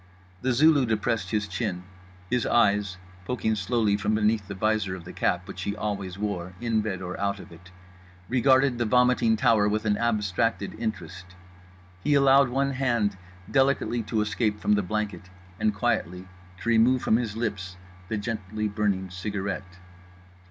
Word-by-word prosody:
The 130 Hz, -, +1 dB
Zulu 140 Hz, +1 st, +4 dB
depressed 115 Hz, +1 st, -1 dB
his 105 Hz, -2 st, -1 dB
chin; 95 Hz, -2 st, -3 dB, 0.4 s
his 125 Hz, +4 st, 0 dB
eyes 100 Hz, -5 st, +2 dB, 0.3 s
(poking 110 Hz, -2 st, -1 dB
slowly 105 Hz, 0 st, +1 dB
from 105 Hz, +1 st, 0 dB
beneath 105 Hz, -1 st, +1 dB
the 100 Hz, -, -6 dB
visor 105 Hz, -1 st, 0 dB
of 90 Hz, -, -10 dB
the 90 Hz, -, -10 dB
cap -, -, 0 dB
which -, -, -7 dB
he 100 Hz, -, -2 dB
always 100 Hz, -3 st, -4 dB
wore, 95 Hz, -3 st, -3 dB
in 115 Hz, -2 st, 0 dB
bed 95 Hz, -3 st, -4 dB
or 90 Hz, 0 st, -5 dB
out 100 Hz, 0 st, -1 dB
of -, -, -12 dB
it) 85 Hz, +2 st, -14 dB, 0.6 s
regarded 130 Hz, 0 st, +3 dB
the 120 Hz, -, +1 dB
vomiting 125 Hz, 0 st, +3 dB
tower 105 Hz, -1 st, +3 dB
with 110 Hz, +1 st, -1 dB
an 105 Hz, -1 st, +2 dB
abstracted 105 Hz, -2 st, 0 dB
interest. 95 Hz, -6 st, -5 dB, 0.8 s
He 145 Hz, -, +3 dB
allowed 135 Hz, -1 st, +5 dB
one 135 Hz, +2 st, 0 dB
hand 120 Hz, -6 st, 0 dB, 0.4 s
delicately 135 Hz, -3 st, +2 dB
to 110 Hz, -2 st, +1 dB
escape 105 Hz, 0 st, -1 dB
from 105 Hz, -, +2 dB
the 105 Hz, -, +3 dB
blanket 105 Hz, -1 st, -3 dB, 0.3 s
and 110 Hz, 0 st, +2 dB
quietly 95 Hz, -5 st, -2 dB, 0.3 s
to 115 Hz, -, -2 dB
remove 120 Hz, +3 st, +4 dB
from 110 Hz, -, +3 dB
his 110 Hz, -3 st, -3 dB
lips 95 Hz, -5 st, -3 dB, 0.3 s
the 110 Hz, -, -2 dB
gently 110 Hz, -1 st, -3 dB
burning 100 Hz, -3 st, -1 dB
cigarette. 95 Hz, -1 st, -4 dB
105 Hz, 160 wpm, -26 LUFS, 100-120 Hz, 0.8 s, allowed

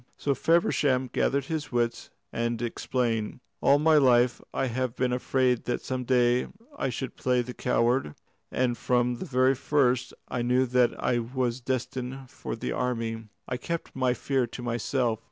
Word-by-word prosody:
So 140 Hz, -, 0 dB
Feversham 135 Hz, -4 st, +2 dB
gathered 140 Hz, 0 st, +1 dB
his 155 Hz, 0 st, -4 dB
wits 120 Hz, -1 st, -1 dB, 0.2 s
and 115 Hz, 0 st, -1 dB
explained: 120 Hz, -1 st, -1 dB, 0.2 s
"All 140 Hz, -, +5 dB
my 155 Hz, +1 st, +4 dB
life 125 Hz, -3 st, +4 dB
I -, -, 0 dB
have 130 Hz, 0 st, -2 dB
been 125 Hz, -1 st, 0 dB
afraid 125 Hz, -1 st, +1 dB
that 120 Hz, -, -2 dB
some 130 Hz, -1 st, -3 dB
day 125 Hz, 0 st, +3 dB, 0.3 s
I 135 Hz, -, -1 dB
should 130 Hz, +1 st, -5 dB
play 125 Hz, -1 st, +1 dB
the 125 Hz, +1 st, -7 dB
coward, 120 Hz, -, +1 dB, 0.4 s
and 125 Hz, -1 st, +1 dB
from 125 Hz, -1 st, +1 dB
the -, -, -5 dB
very 130 Hz, 0 st, +3 dB
first 130 Hz, -2 st, +1 dB
I 125 Hz, -, -2 dB
knew 125 Hz, +2 st, +3 dB
that 125 Hz, -1 st, +2 dB
I 120 Hz, -, +1 dB
was 125 Hz, +1 st, -2 dB
destined 130 Hz, +1 st, -4 dB
for -, -, -5 dB
the -, -, -4 dB
army. 115 Hz, -3 st, -2 dB, 0.2 s
I 125 Hz, -, -2 dB
kept 170 Hz, +5 st, -5 dB
my 130 Hz, -1 st, +1 dB
fear 130 Hz, 0 st, 0 dB
to 120 Hz, +1 st, -8 dB
myself. 120 Hz, -1 st, 0 dB
125 Hz, 165 wpm, -27 LUFS, 120-130 Hz, 0.4 s, All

